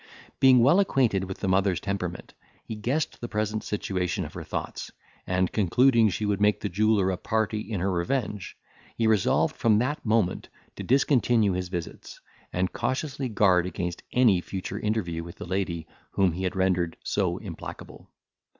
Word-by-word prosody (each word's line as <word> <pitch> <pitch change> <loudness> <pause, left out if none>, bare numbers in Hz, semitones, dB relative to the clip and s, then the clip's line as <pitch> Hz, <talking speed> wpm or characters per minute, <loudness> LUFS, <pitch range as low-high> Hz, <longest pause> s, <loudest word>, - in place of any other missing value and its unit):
Being 130 -3 +6
well 145 +10 +5
acquainted 125 - +2
with 95 0 -8
the 95 - -1
mother's 95 -2 +2
temperament, 90 -3 -4 0.3
he - - -5
guessed 125 +9 -2
the 120 - -4
present 110 0 -2
situation 95 -3 -2
of - - -9
her - - -6
thoughts, - - -5 0.4
and 90 0 +1
concluding 115 +3 +4
she 105 +3 -2
would 100 -1 0
make 105 0 +3
the - - -3
jeweller 100 0 +2
a 90 - -2
party 110 +2 -1
in 105 -4 -4
her 95 +1 0
revenge, 105 +3 -2 0.4
he 115 - +1
resolved 110 -4 +2
from 110 -2 +3
that 130 +7 -1
moment 110 -5 0 0.3
to - - -7
discontinue 120 -5 +3
his 90 0 -3
visits, 85 -2 -7 0.3
and 90 +1 -1
cautiously 135 -1 -2
guard 95 -5 +3
against 90 -1 -4
any 115 -8 +4
future 95 +1 -5
interview 95 -7 -2
with 85 0 -10
the - - -8
lady 90 -3 -2 0.3
whom 95 -2 +3
he 95 +3 -4
had 90 - -2
rendered 90 -3 0
so - - 0
implacable. - - -9
100 Hz, 170 wpm, -26 LUFS, 90-115 Hz, 0.4 s, Being